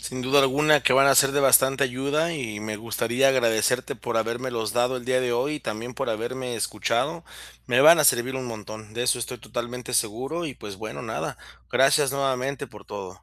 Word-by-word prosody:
Sin 130 0 -6
duda 140 +3 +4
alguna, 145 +1 +3
que 125 - +3
van 135 +1 +6
a 135 - +5
ser 135 0 +5
de 145 - +1
bastante 135 0 +4
ayuda, 140 +6 -1
y 115 -8 -5
me 110 0 -5
gustaría 115 +4 0
agradecerte, 125 -1 +1
por 115 0 -4
habérmelos 115 -1 -2
dado, 125 +2 +1
el 120 - -8
día 130 0 +1
de 120 -1 -1
hoy, 150 +5 -1
y - - -9
también, 115 +4 -6
por - - -4
haberme 120 +3 -4
escuchado. 105 - -2 0.4
Me 130 +3 +3
van 160 +1 +8
a 150 - +3
servir 130 +1 +3
un 130 -1 -5
montón, 110 -1 -9
de 120 - -2
eso 125 0 +1
estoy 120 +1 -5
totalmente 120 +2 -6
seguro 130 +10 -2
y, 135 - -6
pues, 100 -2 -9
bueno, - - -7
nada. - - -5 0.3
Gracias 135 +1 +3
nuevamente 135 -1 -2
por 105 -2 -15
todo. 95 -2 -9
125 Hz, 205 wpm, -24 LUFS, 115-135 Hz, 0.4 s, van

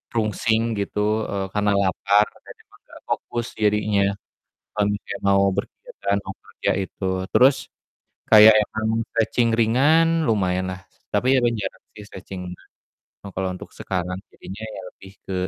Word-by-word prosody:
rungsing 110 0 +1 0.2
gitu, 105 - -4 0.3
eee, 100 -1 -2
karena 105 -1 +1
lapar, 100 +2 +3 0.2
dan - - -12
emang - - -23
gak - - -14
fokus 120 -1 -3
jadinya, 105 -1 +1 0.7
kalo 105 - 0
misalnya 100 -1 -6
mau 100 0 +4
berkegiatan 100 +1 -3
mau - - -5
bekerja - - -4
itu. 95 - -8 0.3
Terus 130 +2 +6 0.8
kayak 110 0 +10
emang 110 +1 -3 0.2
stretching 115 +1 +1
ringan 160 +8 +3
lumayan 95 -4 +1
lah, 90 - -8 0.3
tapi 130 +2 +3
kadang 120 -2 +2
jarang - - -6
sih - - -13
stretching 95 -1 -9
ringan. 90 - -11 0.5
Nah, 100 - -8
kalo 95 0 -2
untuk - - -11
sekarang, 90 -1 -3 0.2
jadinya 100 +3 -10
ya - - -7
lebih 95 0 -15
ke 95 - -4
105 Hz, 145 wpm, -22 LUFS, 95-115 Hz, 0.8 s, kayak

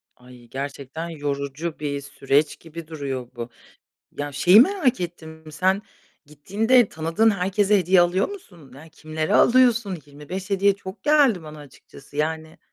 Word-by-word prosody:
Ay, 125 -1 -17
gerçekten 140 +4 -6
yorucu 145 +1 -4
bir 140 -1 -3
süreç 140 +1 0
gibi 165 -1 -10
duruyor 135 -6 -5
bu. 120 0 -6 0.7
Ya, 145 0 -4
şeyi 180 +9 +6
merak 280 - +2
ettim 160 -2 -7
sen 190 +6 +1 0.4
gittiğinde 205 - +2
tanıdığın 165 +8 +1
herkese 200 +1 +1
hediye 180 0 +4
alıyor 175 +2 +2
musun? 175 - -12
Ya 160 +3 -13
kimleri 155 0 -3
alıyorsun? 235 -7 +4
25 165 +8 -8
hediye 195 0 +3
çok 190 0 -10
geldi 280 - +3
bana 155 -1 -10
açıkçası, 145 0 -15
yani. 160 +1 -3
160 Hz, 135 wpm, -23 LUFS, 145-195 Hz, 0.7 s, şeyi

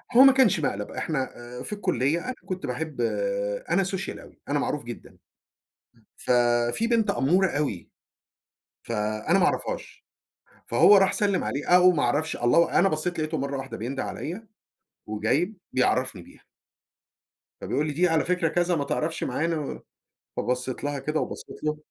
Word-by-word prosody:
هو 255 - +10
ما 270 - +9
كانش 255 -11 +4
مقلب 105 -8 -2
إحنا 150 -5 -2 0.4
آآ، - - -6
في 210 - -3
الكُلّية 170 - 0
أنا 255 - -2
كنت 185 0 -4
باحب 145 +1 -4
آآ، - - -1
أنا 195 - +3
Social 190 0 -4
أوي، - - -16
أنا - - +1
معروف - - -2
جدًا. - - -9 0.9
امم، 110 - -29
ف - - -6 0.5
فيه 230 - 0
بنت 230 -2 +2
أمورة 180 +8 +3
أوي 140 - -3 0.9
ف - - -7
أنا 110 - 0
ما 180 - +4
أعرفهاش، - - -3 0.6
فهو 205 - +6
راح 195 -1 +4
سلِّم 200 -3 +1
عليها 140 +2 -3
أو 180 0 +7
ما 150 -5 0
أعرفش 145 +6 0
الله 165 +8 +3
أنا 195 - +4
بصّيت 165 +2 -2
لقيتُه 155 +1 -1
مرّه 140 0 -3
واحدة 135 0 -6
بينده 130 +4 -3
عليَّ، 195 +8 -6 0.6
وجاي 115 - 0 0.2
بيعرّفني 130 -6 +1
بيها. - - -19 1.2
فبيقول 145 +4 -1
لي 150 - -2
دي 175 +5 +3
على 165 -2 +1
فكرة 180 -2 +1
كذا 175 +2 +1
ما 145 - 0
تعرفش 155 +3 -2
معانا، 155 +2 -2 0.6
فبصّيت 125 +1 -2
لها 145 -1 -2
كده 155 +3 -1
وبصّيت - - -6
له 150 0 0
155 Hz, 165 wpm, -26 LUFS, 135-185 Hz, 1.2 s, هو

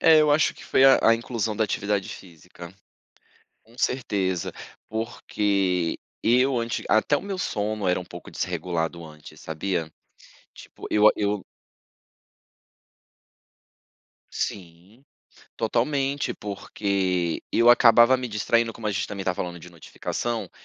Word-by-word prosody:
É, 160 -1 +7
eu 150 -1 +3
acho 150 +1 +3
que - - -13
foi 135 - +3
a 135 - +7
a 115 - +6
inclusão 115 -2 -3
da 110 - +2
atividade 100 -2 -2
física. 85 0 -11 0.9
Com 115 +2 -21
certeza. 95 -8 -1 0.4
Porque 100 -5 -1 0.2
eu 125 +2 +3
antes 115 0 -3
até 110 +7 +3
o - - -6
meu 200 -2 -5
sono 105 - -2
era 90 - +2
um 90 - -8
pouco 85 0 -11
desregulado 85 -1 -3
antes, 75 -1 -13
sabia. 80 0 -3 0.6
Tipo - - -11
eu 105 0 +5
ah, - - +7
eu 105 -2 -1 2.9
sim. 95 +7 -6 0.5
Totalmente, 135 +5 0
porque 95 -4 -2
eu 120 +1 +6
acabava 120 +1 +6
me 125 0 -4
distraindo, 115 +1 +1
como 110 -1 -7
a - - 0
gente 95 - -2
também 100 -2 -6
tá 90 - +1
falando 85 -1 -5
de 90 +2 -13
notificação, 115 +7 -4
105 Hz, 130 wpm, -25 LUFS, 90-120 Hz, 2.9 s, É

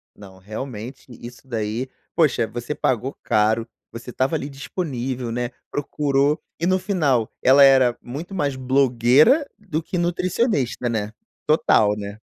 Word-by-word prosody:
Não, 95 -2 -14
realmente 115 +4 -7
isso 120 +2 -12
daí, 115 +1 -3 0.3
poxa, 135 -8 +2
você 120 +6 -5
pagou 130 +2 -1
caro, 110 +2 +1 0.2
você 115 +2 -9
estava 130 +5 0
ali 145 -2 -3
disponível, 130 -3 -4
né, 120 +1 -2 0.2
procurou, 145 0 0 0.2
e 170 - -1
no 185 - +3
final, 150 - 0
ela 135 +2 +7
era 130 -3 +5
muito 155 +10 -7
mais 145 -6 -1
blogueira 130 - +4
do 175 -7 -4
que 175 +3 -4
nutricionista, 175 - 0
né, 110 -2 -2 0.4
total, 105 -9 +3
né. 100 0 -7
130 Hz, 135 wpm, -22 LUFS, 115-150 Hz, 0.4 s, ela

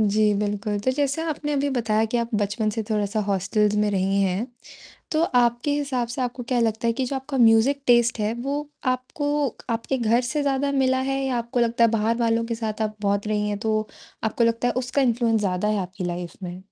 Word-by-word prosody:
जी, 210 0 +3
बिल्कुल। 205 0 -1
तो 260 - +3
जैसे 285 +3 0
आपने 300 -2 -3
अभी 285 0 +1
बताया 225 -3 +1
कि - - +2
आप 235 0 -2
बचपन 210 +1 0
से 225 +1 -3
थोड़ा-सा 215 0 0
हॉस्टल्स 205 +2 +1
में 210 - +1
रही 195 0 +1
हैं। 195 +5 0 0.7
तो 310 - +2
आपके 245 -2 +2
हिसाब 270 -5 -1
से 240 +3 -5
आपको 245 0 -3
क्या 245 +1 -1
लगता 225 +1 0
है 230 - +3
कि 260 +3 -2
जो 275 - -2
आपका 265 +1 -4
म्यूज़िक 235 +4 +5
टेस्ट 240 -1 +4
है, 210 +1 0
वो 285 +4 -3 0.2
आपको 290 +3 -1 0.2
आपके 230 +3 -1
घर 235 +1 +3
से 300 0 0
ज़्यादा 280 0 0
मिला 260 -1 +2
है 270 0 0
या 260 -2 0
आपको 235 +1 -2
लगता 235 0 +3
है 230 - +4
बाहर 225 +1 +1
वालों 230 0 +1
के 230 0 -3
साथ 220 -1 -3
आप 215 0 -2
बहुत 200 0 0
रही 210 -1 0
हैं 205 - -2
तो 215 0 -1 0.4
आपको 220 +2 +1
लगता 230 +1 +1
है - - -1
उसका 270 +2 0
इन्फ्लुएंस 235 -3 +2
ज़्यादा 190 +1 0
है 215 - +1
आपकी 180 +1 -6
लाइफ़ 175 0 -4
में? 180 +1 -6
230 Hz, 220 wpm, -24 LUFS, 210-260 Hz, 0.7 s, म्यूज़िक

